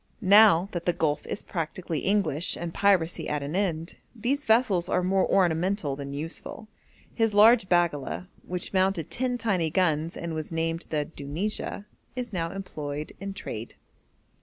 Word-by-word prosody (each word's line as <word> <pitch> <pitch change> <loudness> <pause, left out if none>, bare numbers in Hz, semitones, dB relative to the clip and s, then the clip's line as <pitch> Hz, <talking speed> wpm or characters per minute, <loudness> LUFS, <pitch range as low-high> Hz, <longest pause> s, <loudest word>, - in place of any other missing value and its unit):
Now 205 -4 +7
that 175 -1 -5
the 175 - +3
Gulf 155 -3 -1
is - - -4
practically 165 -1 -3
English 180 -5 +1
and 170 -1 -5
piracy 185 -4 +2
at 150 -1 -1
an 145 +4 -4
end, 170 -4 -1 0.2
these 255 +6 -1
vessels 220 -6 +3
are 180 - +1
more 190 +1 +2
ornamental 175 -3 +1
than 140 0 -6
useful. 165 +8 -6 0.5
His 225 -3 +1
large 220 -1 +6
baggala, 175 -1 +1 0.2
which 180 +1 -5
mounted 190 -4 +1
ten 250 0 -1
tiny 190 -9 0
guns 165 -2 0
and 170 -1 -4
was 155 0 -5
named 165 +1 -2
the 150 -2 0
Dunijah, 165 +8 -4 0.3
is 245 -3 -5
now 165 -2 -1
employed 150 -6 -6
in 195 0 -6
trade. 115 - -7
175 Hz, 155 wpm, -27 LUFS, 160-200 Hz, 0.5 s, Now